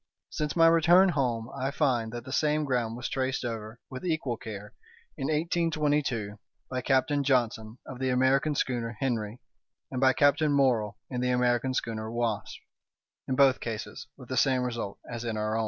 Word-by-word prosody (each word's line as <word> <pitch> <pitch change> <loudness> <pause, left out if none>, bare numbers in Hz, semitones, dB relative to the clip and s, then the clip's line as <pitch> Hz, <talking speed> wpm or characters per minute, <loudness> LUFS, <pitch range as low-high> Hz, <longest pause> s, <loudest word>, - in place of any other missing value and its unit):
Since 150 -1 -2
my 165 -1 +6
return 170 +3 +6
home 120 -8 -1
I 135 - -1
find 130 -7 0
that 120 0 -7
the 130 - -8
same 150 +1 +1
ground 120 -4 -1
was 125 - -4
traced 130 -1 -2
over, 110 -1 -5
with 130 -1 -8
equal 160 -8 -1
care, 105 -3 -8 0.4
in 135 - -4
1822, 150 - 0 0.3
by 130 0 -2
Captain 135 +2 +2
Johnson, 115 -4 0
of 125 - -9
the 130 0 0
American 135 +4 +2
schooner 120 -4 -2
Henry, 115 -3 -2 0.5
and 130 - -3
by 130 -1 +5
Captain 145 +2 +3
Morrell 120 -7 +2
in 125 -1 -2
the 125 - +1
American 125 +1 +1
schooner 110 -2 -3
Wasp—in 120 +2 -5
both 135 -1 +5
cases 115 +1 -6
with 130 -3 -12
the 130 - -2
same 130 0 +3
result 115 -5 -4
as 120 0 -5
in 115 -2 -3
our 110 0 -1
own. - - 0
125 Hz, 170 wpm, -28 LUFS, 115-140 Hz, 0.5 s, my